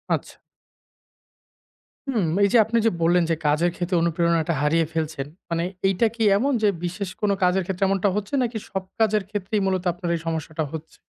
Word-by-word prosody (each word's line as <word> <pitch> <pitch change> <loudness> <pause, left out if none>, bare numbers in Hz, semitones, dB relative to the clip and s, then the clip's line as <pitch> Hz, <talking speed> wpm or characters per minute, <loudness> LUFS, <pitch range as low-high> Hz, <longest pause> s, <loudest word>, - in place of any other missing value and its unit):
আচ্ছা। - - -8 1.7
হুম, 230 -9 +1 0.2
এই - - +6
যে - - +7
আপনি 230 +1 0
যে 225 - +6
বললেন 175 +1 +4
যে 165 - +2
কাজের 160 +4 +2
ক্ষেত্রে 180 +1 -2
অনুপ্রেরণাটা 170 -1 +1
হারিয়ে 165 +2 +2
ফেলছেন। 155 -3 -2 0.2
মানে 170 0 0 0.2
এইটা 195 +4 +2
কি 225 - -1
এমন 275 +5 +1
যে 210 - +5 0.2
বিশেষ 185 +2 -4
কোন 205 -1 +2
কাজের 180 +1 +3
ক্ষেত্রে 190 +1 -2
এমনটা 195 +1 +2
হচ্ছে 210 +4 -4
নাকি 235 -1 -2
সব 190 -1 -3 0.2
কাজের 215 -2 +3
ক্ষেত্রেই 205 0 -2
মূলত 190 -1 0
আপনার 175 0 -5
এই - - -3
সমস্যাটা 160 0 -2
হচ্ছে? 160 0 -8
180 Hz, 180 wpm, -24 LUFS, 165-205 Hz, 1.7 s, যে